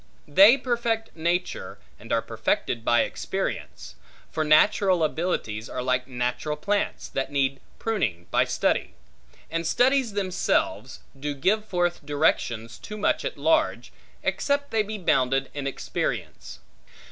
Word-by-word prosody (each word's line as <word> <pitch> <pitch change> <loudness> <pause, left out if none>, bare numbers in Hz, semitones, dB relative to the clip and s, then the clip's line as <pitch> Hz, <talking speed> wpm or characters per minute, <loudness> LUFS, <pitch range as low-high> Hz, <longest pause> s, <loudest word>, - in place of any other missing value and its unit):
They 195 - +7
perfect 235 -3 -1
nature, 170 +2 -2 0.2
and - - -11
are - - +2
perfected 115 -2 -1
by 120 0 +4
experience: 65 +1 -4 0.4
for 160 - 0
natural 175 +3 +4
abilities 150 -10 -2
are 125 - -4
like 125 0 0
natural 125 +4 -2
plants, 205 +6 -1
that 135 - -3
need 135 -1 0 0.2
proyning, 115 - -1
by - - +3
study; - - 0 0.6
and 165 0 -1
studies 260 -1 +3
themselves, 190 -3 -1 0.2
do 145 +1 -3
give 210 +10 +1
forth 175 -4 -1
directions 120 -6 0
too 210 - -8
much 210 - +1
at - - -4
large, 320 0 +1 0.3
except 285 0 0
they 225 - +3
be 215 +1 -4
bounded 135 -7 +1
in 145 -1 -4
by - - +1
experience. - - -4
165 Hz, 135 wpm, -25 LUFS, 135-215 Hz, 0.6 s, They